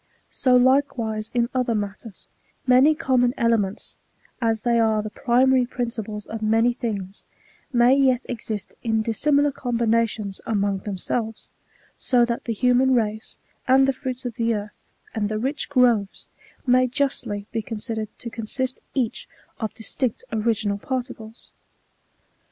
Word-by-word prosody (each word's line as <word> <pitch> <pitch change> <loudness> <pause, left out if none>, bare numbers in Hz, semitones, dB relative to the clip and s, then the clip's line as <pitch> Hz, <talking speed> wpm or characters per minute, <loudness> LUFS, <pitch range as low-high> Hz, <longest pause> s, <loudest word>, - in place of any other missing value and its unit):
So 255 -2 +3
likewise 245 -4 +2
' - - -38
in 235 -1 +2
other 250 -3 +1
matters, 205 0 -6 0.4
many 265 +5 +5
common 250 -3 +2
elements, 225 -5 0 0.4
as 225 -2 0
they 235 -1 +2
are 220 -2 +2
the 215 - -6
pri 245 +3 +2
mary 260 -2 +3
principles 225 -4 -4
of 225 0 -6
many 225 +3 +3
things, 205 -5 -5 0.5
may 245 +1 +5
yet 260 -3 +2
exist 220 -3 -5
in 220 -2 0
dissimilar 285 +6 +2
combinations 230 -5 -1
among 200 -3 0
themselves; 215 +3 -4 0.5
so 245 -2 +3
that 235 0 -3
the 235 - -2
human 250 +3 +3
race, 220 -2 -2 0.3
and 265 +1 +5
the 270 - +2
fruits 260 -2 -5
of 240 -3 -5
the 230 -1 +1
earth, 205 0 -5 0.4
and 210 -2 -1
the 215 - -2
rich 265 +7 -2
groves, 240 -7 +2 0.4
may 255 0 +4
justly 250 -6 -2
be 230 - -1
considered 220 0 -4
to 235 - -7
consist 255 +4 -3 0.2
each 250 -5 -2 0.3
of 220 -2 -2
distinct 235 +1 -2
original 215 -2 0
particles. 240 -3 -6
235 Hz, 140 wpm, -23 LUFS, 215-255 Hz, 0.5 s, many